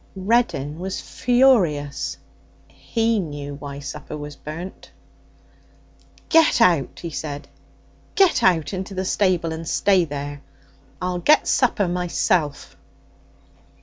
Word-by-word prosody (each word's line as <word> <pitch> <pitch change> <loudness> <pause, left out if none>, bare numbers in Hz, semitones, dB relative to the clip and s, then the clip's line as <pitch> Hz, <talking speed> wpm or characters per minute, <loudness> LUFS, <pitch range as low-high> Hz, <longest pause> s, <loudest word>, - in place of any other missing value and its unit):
Reddin 185 - 0
was 190 +1 -4
furious. 180 - +2 0.5
He 225 -1 -1
knew 145 -5 -5
why 140 0 -8
supper 145 +1 -7
was 145 -1 -8
burnt. 165 +7 -8 1.4
'Get 325 -5 +4
out!' 170 - +2
he 170 - -5
said. 145 -1 -5 0.7
'Get 385 -4 +4
out 165 -2 +2
into 190 +1 -5
the 185 0 -2
stable 180 -4 +1
and 160 0 -7
stay 190 -4 +3
there. 145 -1 -6 0.6
I'll 180 -1 -2
get 300 - +4
supper 225 -6 +2
myself.' 175 -4 -1
175 Hz, 110 wpm, -22 LUFS, 145-195 Hz, 1.4 s, Get